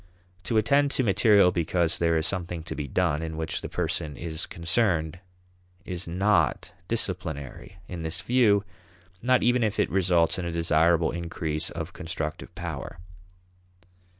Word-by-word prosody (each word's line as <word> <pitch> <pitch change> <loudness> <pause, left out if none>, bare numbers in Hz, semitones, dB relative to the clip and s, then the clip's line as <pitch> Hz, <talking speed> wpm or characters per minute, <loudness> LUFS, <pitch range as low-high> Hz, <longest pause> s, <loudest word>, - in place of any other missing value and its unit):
To 115 - 0
attend 140 +6 +3
to 135 - 0
material 100 -2 +5
because 85 -1 0
there 85 -1 +2
is 80 - 0
something 85 -3 -2
to - - -6
be 75 - -4
done 80 +1 0
in 80 -1 -5
which 80 0 -2
the - - -6
person 75 -2 -2
is 80 0 -4
concerned 85 -2 0 0.7
is 90 -1 -5
not 95 +5 +1 0.2
disciplinary 90 - -4
in 90 -2 -6
this 80 0 -3
view; 110 -3 +3 0.6
not 125 +1 +3
even 120 +1 +3
if 110 -2 0
it - - +1
results 90 0 +2
in 90 - -3
a 85 - -2
desirable 85 0 +3
increase 85 -2 -3
of 85 +1 -6
constructive 80 -3 -5
power. - - -6
85 Hz, 150 wpm, -26 LUFS, 80-100 Hz, 0.7 s, material